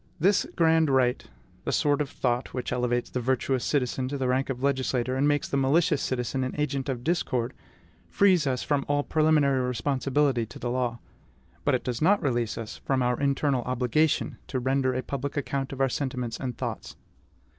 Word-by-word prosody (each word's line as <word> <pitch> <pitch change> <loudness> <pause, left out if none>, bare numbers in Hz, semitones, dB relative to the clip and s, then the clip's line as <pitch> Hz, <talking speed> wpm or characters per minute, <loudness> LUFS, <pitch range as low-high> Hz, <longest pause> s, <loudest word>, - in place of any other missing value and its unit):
This 195 +5 +3
grand 160 -2 +4
right 130 -2 +2 0.4
the - - -2
sword 145 0 +2
of 145 - -2
thought, 125 0 -2
which 125 - -3
elevates 120 -1 -1
the 125 - -1
virtuous 130 +1 0
citizen 130 -2 0
to 140 +2 -3
the 130 -1 -1
rank 130 +2 +1
of 130 -1 -4
legislator, 130 -2 0
and 140 +2 +2
makes 145 0 +1
the 140 - -1
malicious 150 +3 +2
citizen 130 +1 -1
an 130 - -3
agent 140 -2 -1
of 125 -2 -3
discord 130 -7 0 0.6
frees 185 -7 +3
us 130 -2 0
from 145 -2 0
all 145 0 +1
preliminary 150 -4 +3
responsibility 130 +1 +1
to - - -11
the 120 - -3
law; 125 -2 -1 0.7
but - - +3
it - - -2
does 120 -2 -3
not 200 +6 +4
release 120 -5 -1
us 115 -1 -6
from 130 -2 0
our 125 0 0
internal 140 -1 +1
obligation 130 +5 +1
to 130 - -3
render 130 +1 +1
a 130 - -2
public 140 +1 -4
account 135 -1 -2
of 135 - -7
our 135 - +4
sentiments 125 -3 -3
and 125 -3 -4
thoughts. - - -5
130 Hz, 190 wpm, -27 LUFS, 125-145 Hz, 0.7 s, grand